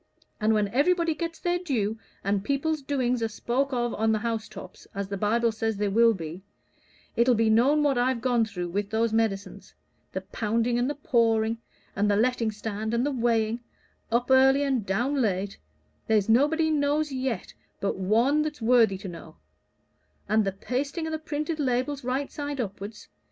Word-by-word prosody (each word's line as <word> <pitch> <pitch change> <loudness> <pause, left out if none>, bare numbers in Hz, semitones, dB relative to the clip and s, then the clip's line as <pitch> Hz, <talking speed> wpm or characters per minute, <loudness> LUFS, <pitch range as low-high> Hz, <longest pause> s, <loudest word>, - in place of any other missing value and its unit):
And 215 +1 +3
when 210 -1 +2
everybody 335 - +2
gets 330 +1 -4
their 355 0 0
due, 225 - -1 0.2
and 200 0 0
people's 285 +5 -1
doings 255 -3 0
are 225 - +1
spoke 250 +5 -1
of 240 -2 -1
on 220 0 +1
the 220 - +2
house 225 0 -3
tops, 195 -3 -11
as 200 -1 -3
the 200 - -2
Bible 230 +4 +1
says 220 -1 -2
they 205 0 0
will 230 +2 +4
be, 165 +1 -7 0.7
it'll 240 +1 +4
be 225 0 +3
known 275 +7 +4
what 275 -4 +2
I've 250 0 +1
gone 240 -1 +2
through 180 -5 -5
with 200 +3 -2
those 225 0 0
medicines 220 -3 -2 0.4
the - - -3
pounding 230 +2 -1
and 245 +2 +1
the 295 - -2
pouring, 230 -6 +1 0.4
and 205 +1 +1
the 205 - +3
letting 235 +1 +1
stand, 215 +1 -3
and 240 +3 +1
the 290 - 0
weighing 230 -2 +1 0.5
up 245 +2 +1
early 265 +2 +6
and 265 -5 0
down 250 +9 0
late 200 -3 -1 0.5
there's 215 -3 +2
nobody 300 +7 +3
knows 295 0 +1
yet 255 -6 -3 0.3
but 200 - -1
One 230 +10 +2
that's 305 -1 -3
worthy 225 -4 +4
to 195 - -8
know; 170 -2 -10 0.9
and 215 +1 +3
the 195 - 0
pasting 275 - -3
o' - - -4
the 315 - -2
printed 305 +1 -3
labels 265 +1 -1
right 260 +3 -2
side 290 -2 -5
upwards. 205 -1 -6
235 Hz, 180 wpm, -27 LUFS, 215-275 Hz, 0.9 s, early